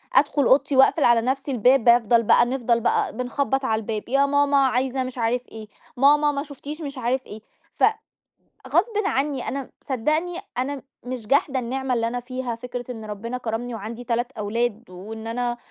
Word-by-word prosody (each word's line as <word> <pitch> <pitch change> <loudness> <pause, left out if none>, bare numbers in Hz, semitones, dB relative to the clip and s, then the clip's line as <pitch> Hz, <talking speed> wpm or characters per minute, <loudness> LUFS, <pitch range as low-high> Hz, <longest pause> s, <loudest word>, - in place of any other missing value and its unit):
أدخُل 290 0 +4
أوضتي 275 +2 +3
واقفل 270 +3 +5
على 235 -1 +5
نفْسي 270 +4 -2
الباب، 250 +1 +4
بافضَل 235 -1 +5
بقى 235 - +5
نفضَل 240 -2 +1
بقى - - 0
بنخبّط 270 +2 -1
على 220 -3 +1
الباب، 220 0 -5
يا 275 +2 +3
ماما 285 0 +2
عايزة 260 +1 0
مش 255 0 -7
عارف 245 +2 -1
إيه، 220 -1 -10 0.3
ماما 295 +3 +5
ما 280 -1 -3
شُفتيش 295 +2 -8
مش 280 -2 -6
عارف 255 +2 -1
إيه، 215 +1 -10 0.3
ف - - -4 0.9
غصْبٍ 370 - +1
عني، 275 -7 -1
أنا 275 -1 -4 0.2
صدقني 310 +7 -1 0.2
أنا 270 +2 -2 0.2
مش 245 -3 -6
جاحدة 275 +1 +2
النعمة 260 +1 -2
اللي 230 -1 0
أنا 245 +1 -3
فيها، 255 -1 -4
فكرة 245 +1 -7
إن 225 -3 -7
ربنا 220 +4 -5
كرَّمني 240 0 -4
وعندي 225 +3 -7
3 240 +1 -1
أولاد، 230 0 -2
وإن 220 +5 -8
أنا 240 +1 -2
250 Hz, 175 wpm, -23 LUFS, 230-275 Hz, 0.9 s, واقفل